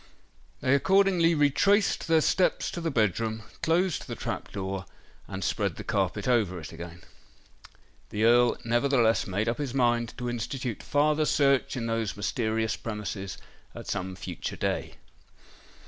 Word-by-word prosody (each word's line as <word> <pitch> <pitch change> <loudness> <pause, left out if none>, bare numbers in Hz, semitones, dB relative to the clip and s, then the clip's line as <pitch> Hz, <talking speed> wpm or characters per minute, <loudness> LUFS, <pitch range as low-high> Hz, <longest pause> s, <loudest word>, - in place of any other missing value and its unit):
They 130 - +2
accordingly 180 +1 +4
retraced 190 +10 +3
their 165 -1 +4
steps 185 +4 +1
to 170 - -5
the 165 - -1
bed 110 - +1
room, 110 -1 -3 0.2
closed 170 +1 +1
the - - -5
trap - - -5
door, 95 -1 -4 0.4
and 95 0 -5
spread - - -1
the - - -7
carpet - - -1
over 105 -8 +2
it 80 - -9
again. 85 0 -9 1.1
The 105 - -2
Earl 120 +1 +5
nevertheless 120 -1 +2
made 100 +4 -1
up 120 +3 -1
his 135 -3 -3
mind 120 -2 +1
to 125 -1 -4
institute 120 0 -3
farther 150 +1 +2
search 140 -3 +2
in 115 - -2
those 115 -2 -2
mysterious 110 +1 -1
premises 105 -3 -5 0.4
at - - -8
some 95 -2 -3
future - - -5
day. - - -2
120 Hz, 145 wpm, -28 LUFS, 105-145 Hz, 1.1 s, Earl